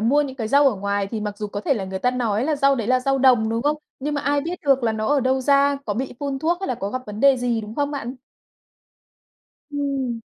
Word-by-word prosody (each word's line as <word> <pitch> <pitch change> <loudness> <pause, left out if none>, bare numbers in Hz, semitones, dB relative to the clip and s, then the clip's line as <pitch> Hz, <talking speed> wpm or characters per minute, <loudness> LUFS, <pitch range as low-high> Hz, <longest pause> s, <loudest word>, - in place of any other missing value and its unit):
mua 265 +7 +3
những 270 -2 -6
cái 220 -3 -3
rau 280 +1 +5
ở 235 - -1
ngoài 200 0 -1
thì 215 +1 -5
mặc 210 -1 -5
dù 210 - -3
có 205 - -5
thể 275 - +1
là 200 -4 -3
người 190 0 -5
ta 250 - +1
nói 235 -3 -1
là 305 0 0
rau 275 0 +4
đấy 230 -4 -3
là 255 0 +3
rau 270 +1 +1
đồng, 245 -4 +4
đúng 230 +2 -1
không? 295 +1 +1 0.2
Nhưng 295 +2 -3
mà 285 - -1
ai 285 0 +1
biết 345 +4 -4
được 270 -2 +3
là 225 -2 +1
nó 215 0 -2
ở 290 -1 +3
đâu 260 +1 +1
ra, 280 +1 +3
có 205 - -1
bị 260 +5 -3
phun 280 -1 -2
thuốc 340 +5 0
hay 385 - -3
là 250 - 0
có 200 -2 -4
gặp 255 0 -4
vấn 210 +1 -7
đề 275 -1 +6
gì, 245 -2 -1
đúng 215 +1 -8
không 290 0 -1
bạn? 270 -3 -5 1.5
Ừm. 275 -5 -2
255 Hz, 280 wpm, -22 LUFS, 220-280 Hz, 1.5 s, đề